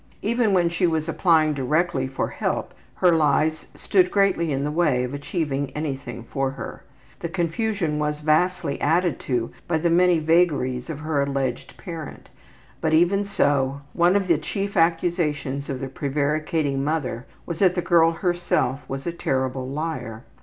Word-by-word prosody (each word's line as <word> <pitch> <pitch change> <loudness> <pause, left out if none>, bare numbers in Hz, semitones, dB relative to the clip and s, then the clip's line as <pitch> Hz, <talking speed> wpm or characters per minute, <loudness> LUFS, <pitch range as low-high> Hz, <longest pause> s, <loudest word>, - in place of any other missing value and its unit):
Even 230 0 +2
when 180 -3 +3
she 170 +1 +1
was 160 -1 -1
applying 160 -2 +3
directly 140 0 0
for 135 - -2
help - - -3 0.2
her 180 - +4
lies 155 0 +2
stood 185 -2 +2
greatly 190 -5 +2
in 135 0 -1
the 150 - -1
way 150 -6 +2
of 125 +2 -4
achieving 145 -1 -2
anything 140 -5 -4
for 135 +3 -2
her. 135 - -8 0.4
The 170 - -4
confusion 170 -2 -1
was 150 0 -1
vastly 155 0 +1
added 165 0 +2
to 120 -3 0 0.2
by 160 - +1
the 170 +1 +1
many 180 0 +4
vagaries 155 -6 +1
of 150 -2 -5
her 155 -2 0
alleged 135 -3 -2
parent, 165 -6 -8 0.5
but, 160 -1 +2
even 190 +5 +3
so, 140 -7 +1
one 175 +2 +3
of 200 -2 +1
the 165 -4 +3
chief 200 +5 -4
accusations 165 -5 0
of 135 -2 -3
the 135 - -4
prevaricating 145 0 -1
mother 140 -5 -2 0.2
was 170 -2 -5
that 185 -2 +4
the 175 - 0
girl 170 -2 +4
herself 175 -6 0
was 135 0 -5
a 170 - -1
terrible 130 -5 -2
liar. 140 -7 -4
155 Hz, 160 wpm, -23 LUFS, 140-175 Hz, 0.5 s, her